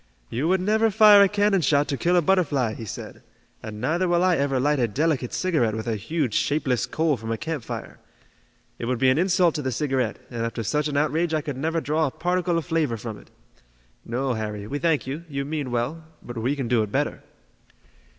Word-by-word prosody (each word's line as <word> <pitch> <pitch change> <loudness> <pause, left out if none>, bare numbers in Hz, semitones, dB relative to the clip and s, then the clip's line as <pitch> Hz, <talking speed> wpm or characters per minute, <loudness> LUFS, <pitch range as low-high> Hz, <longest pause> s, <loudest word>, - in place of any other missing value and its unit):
"You 135 +7 -1
would 185 +1 +2
never 220 +3 +2
fire 210 -1 +7
a 200 - +6
cannon 205 -2 +2
shot 145 -2 +2
to 140 - 0
kill 175 +6 +1
a 175 - +4
butterfly," 145 - +2
he 115 - -7
said, - - -8 0.4
"and 110 -1 -7
neither 165 +9 0
will 175 0 +2
I 185 -1 +4
ever 140 -2 0
light 145 +2 +2
a 120 - +2
delicate 135 +2 0
cigarette 150 -12 0
with 110 0 -4
a 115 -2 -1
huge, 125 +3 -2
shapeless 130 -6 0
coal 155 -3 0
from 110 0 -6
a 115 - -1
campfire. 155 -5 -5 0.8
It - - -3
would 125 +1 0
be 130 +1 +4
an 135 - +1
insult 180 -2 +3
to 150 - -3
the 130 -2 -2
cigarette, 130 -3 -1
and 115 -2 -3
after 115 0 -3
such 150 +7 0
an 145 -1 -2
outrage 160 +3 +1
I 155 - 0
could 145 -2 -5
never 160 +5 -1
draw 155 0 0
a - - -1
particle 175 +3 0
of 165 - -2
flavor 160 -8 0
from 110 -1 -7
it. - - -19 0.7
No, 130 +3 -2
Harry, 105 -2 -4
we 145 +7 -4
thank 165 -3 +1
you, 140 +5 -5
you 140 -1 -3
mean 145 -2 -3
well, 125 +7 -2 0.2
but 120 - -8
we 120 +5 -1
can 135 -4 -3
do 120 -1 +2
it 105 -1 -3
better." - - -1
145 Hz, 220 wpm, -24 LUFS, 120-165 Hz, 0.8 s, fire